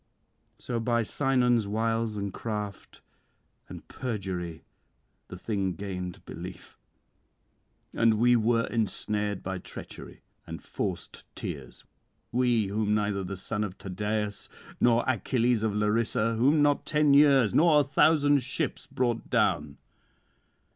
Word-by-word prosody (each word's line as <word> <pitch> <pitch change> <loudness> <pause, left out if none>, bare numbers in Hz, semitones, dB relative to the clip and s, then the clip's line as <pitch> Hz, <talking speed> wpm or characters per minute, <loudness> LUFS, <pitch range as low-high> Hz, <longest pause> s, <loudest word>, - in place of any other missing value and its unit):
'So 120 -2 -3
by 115 0 +1
Sinon's 125 -3 +1
wiles 115 +1 -1
and 100 -1 -3
craft 105 -3 -6 0.7
and - - -10
perjury 95 -9 -5 0.6
the 90 - -9
thing 95 -2 -2
gained 90 -3 -6
belief; - - -9 1.2
and 115 -1 +3
we 120 +3 +4
were 115 0 +2
ensnared 105 -2 -2
by 95 0 -4
treachery - - -10 0.2
and - - -7
forced - - -5
tears, 65 -4 -7 0.5
we 120 -3 +2
whom 105 +1 0
neither 100 -2 0
the 95 +1 -5
son 105 +3 -3
of 100 -2 -5
Tydeus 105 +2 -3 0.3
nor 120 0 +4
Achilles 125 -2 +1
of 110 -2 -1
Larissa, 105 +1 +1
whom 140 +7 +3
not 145 -1 +2
ten 150 -2 +3
years 140 -7 +5
nor 155 -2 +5
a - - +1
thousand 145 0 +4
ships 135 +3 -3
brought 120 -2 -2
down. - - +1
110 Hz, 120 wpm, -28 LUFS, 100-125 Hz, 1.2 s, years